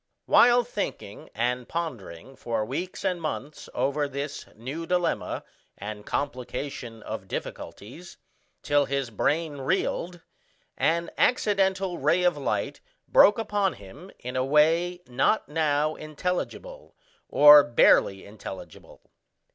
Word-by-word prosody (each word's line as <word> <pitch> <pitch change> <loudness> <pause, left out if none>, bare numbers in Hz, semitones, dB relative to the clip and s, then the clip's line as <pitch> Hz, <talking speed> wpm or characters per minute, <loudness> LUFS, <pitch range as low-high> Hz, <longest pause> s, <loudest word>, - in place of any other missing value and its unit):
While 245 0 +6
thinking 205 - -6
and 125 +2 -1
pondering 135 - -6
for 115 -4 -2
weeks 170 +10 -5
and 180 -2 0
months 150 -1 -5
over 140 +3 0
this 140 +1 -6
new 140 +9 -6
dilemma 180 -2 -1 0.3
and 105 +1 -7
complication 125 -4 -4
of 105 -3 -6
difficulties, 130 - -8 0.5
till 145 -1 +2
his 135 -3 -2
brain 150 +6 -1
reeled, 175 +3 -2 0.5
an 170 +1 0
accidental 195 -6 +1
ray 165 +6 +2
of 180 -2 +3
light 145 - -3 0.3
broke 210 - +6
upon 205 -4 0
him 120 - -13
in 125 +1 -7
a 130 - +1
way 165 +5 +2
not 125 - +1
now 150 0 +1
intelligible, 180 - -5 0.3
or 145 0 +9
barely 100 -5 +3
intelligible. 100 -2 -11
150 Hz, 115 wpm, -26 LUFS, 125-175 Hz, 0.5 s, or